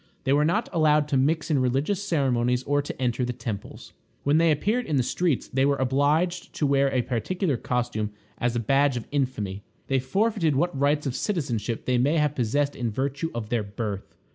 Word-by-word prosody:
They 135 - +2
were 145 +1 +4
not 165 +3 +1
allowed 150 -2 +3
to 145 - +1
mix 155 +4 +1
in 145 - +3
religious 135 +10 0
ceremonies 125 -8 +1
or 145 +1 +1
to 145 - -7
enter 125 -1 0
the 125 0 -1
temples. 115 -4 -7 0.3
When 145 +3 +3
they 165 0 +4
appeared 215 - +1
in 150 - 0
the 130 - +3
streets 160 +2 0
they 135 +1 0
were 140 +1 +3
obliged 145 +7 +1
to 150 - -1
wear 140 -1 +3
a 130 -2 +1
particular 140 - -1
costume 120 -3 -2 0.3
as 120 0 0
a - - +1
badge 135 +3 +2
of 115 - -5
infamy. 115 -9 -2 0.3
They 135 -1 +2
forfeited 175 - +1
what 175 +3 +1
rights 145 +2 +1
of 135 -2 -2
citizenship 120 - -2
they 125 -1 +2
may 145 +6 +2
have 150 -2 +2
possessed 140 +3 0
in 120 -2 -2
virtue 140 +7 -2
of 110 -2 -4
their 120 -2 +1
birth. 100 -1 -5
135 Hz, 200 wpm, -25 LUFS, 120-150 Hz, 0.3 s, were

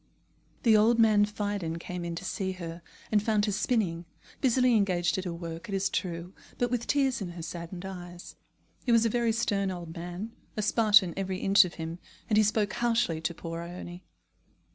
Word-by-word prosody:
The 225 -3 +6
old 220 +2 +5
man 215 -2 +5
Phidon 205 -5 -3
came 180 +1 -6
in 170 -1 -4
to 180 - -6
see 190 -1 -2
her, 170 -2 -7 0.3
and 210 -1 +4
found 210 -1 +2
her 210 - 0
spinning, 195 -5 0 0.4
busily 255 -1 +4
engaged 185 -4 +2
at 190 - -5
her 180 - -2
work, 170 +1 -7
it 195 - -1
is 195 0 0
true, 175 0 -3 0.2
but 245 -1 0
with 240 -2 -1
tears 270 -5 +2
in 175 -3 -4
her 170 -1 -7
saddened 170 +2 -6
eyes. 175 -2 -8 0.5
He 245 - 0
was 230 0 +5
a - - +3
very 235 0 +1
stern 200 -3 0
old 175 -3 -6
man, 175 +6 -6 0.3
a 215 - 0
Spartan 210 -4 +5
every 190 -1 -2
inch 195 +1 +5
of 175 - -7
him, 165 +1 -5 0.3
and 215 - +1
he - - +7
spoke 210 -1 +1
harshly 230 -9 +1
to 165 +1 -1
poor 165 0 -5
Ione. 175 +1 -8
195 Hz, 195 wpm, -29 LUFS, 175-215 Hz, 0.5 s, he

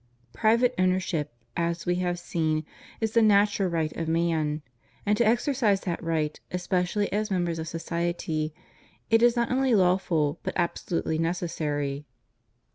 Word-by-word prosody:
Private 235 +3 +3
owner 185 0 +3
ship, 155 -5 -3 0.2
as 170 -1 -1
we 175 - +2
have 180 -1 -1
seen, 160 -3 -1 0.3
is 220 -1 0
the 230 - +4
natural 205 -2 +4
right 160 -2 -1
of 165 - -3
man; 160 -2 0 0.4
and 210 0 +3
to 235 - +3
exercise 235 -3 +2
that 175 -3 -3
right, 160 -2 -1
especially 180 +3 -1
as 210 +1 0
members 175 -3 -1
of 160 - -4
society, 165 -2 -2 0.6
is 235 +1 +5
not 235 0 0
only 260 -2 +3
lawful, 180 -6 +2
but - - -3
absolutely 170 -2 -1
necessary. 150 -4 -2
175 Hz, 140 wpm, -27 LUFS, 160-205 Hz, 0.6 s, is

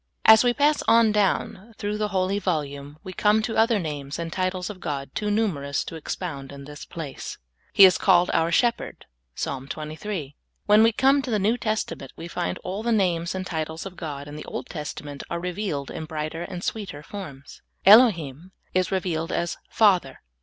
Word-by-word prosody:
As 220 +1 +9
we 245 - +4
pass 290 +4 +2
on 230 -1 +5
down 210 +1 0
through 210 +1 -3
the 210 - +1
holy 195 0 0
volume, 145 -5 -3
we 185 -2 -7
come 210 +3 +3
to 225 - -2
other 225 0 +4
names 145 -6 -4
and 165 -1 -4
titles 185 -1 -1
of 195 - -11
God 140 -5 -4
too 210 - -2
numerous 170 -10 0
to - - -8
expound 150 -3 -5
in 140 0 -10
this 145 +1 -9
place. 155 -5 -7 0.3
He 195 - +9
is 185 - +5
called 180 -3 +4
our 165 +1 +2
Shepherd. 235 +5 0 0.3
(Ps. - - -2 0.2
23.) 155 0 -5 0.3
When 210 +1 +6
we 225 +1 +6
come 270 +5 +3
to 265 - -6
the 220 - +2
New 210 +4 +2
Testament, 215 - -3
we 165 - -8
find 90 - -3
all 190 +3 -4
the 235 +1 -1
names 180 -5 +1
and 185 0 -3
titles 160 -1 -4
of 190 -2 -8
God 145 -5 -6
in 145 - -8
the 150 - -8
Old - - -5
Testament 150 -2 -6
are 170 - -2
revealed 180 -5 -3
in 160 - -5
brighter 155 +1 -4
and 175 +1 -6
sweeter 195 -9 -4
forms. 150 -8 -9 0.2
Elohim 185 - +5 0.2
is 185 0 +1
revealed 170 -4 -1
as 170 0 -1
Father. 185 -11 +3
180 Hz, 190 wpm, -25 LUFS, 150-210 Hz, 0.3 s, As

